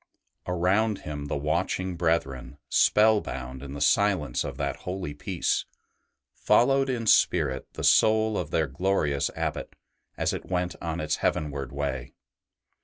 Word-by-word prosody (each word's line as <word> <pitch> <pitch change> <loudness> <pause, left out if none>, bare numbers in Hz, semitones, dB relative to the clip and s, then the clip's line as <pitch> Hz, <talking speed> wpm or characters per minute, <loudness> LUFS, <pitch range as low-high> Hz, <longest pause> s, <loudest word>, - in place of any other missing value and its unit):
Around 95 +4 +1
him 75 -1 -6
the 70 - -2
watching 85 +5 -1
brethren, 70 -6 -1
spell 110 0 +4
bound 65 0 -7
in 70 -1 -8
the 70 - -6
silence 75 -5 +2
of - - -6
that - - -2
holy 90 -4 -5
peace, 80 +4 -1 0.7
followed 135 +2 +3
in 120 -3 -2
spirit - - +2
the - - -6
soul 110 0 +4
of 85 -6 -2
their 80 -1 +1
glorious 75 -1 0
Abbot - - -4 0.4
as - - 0
it - - -6
went 90 -1 -1
on 85 0 -3
its 75 -1 -1
heavenward 70 -3 -2
way. 70 -3 -4
85 Hz, 140 wpm, -26 LUFS, 70-95 Hz, 0.7 s, spell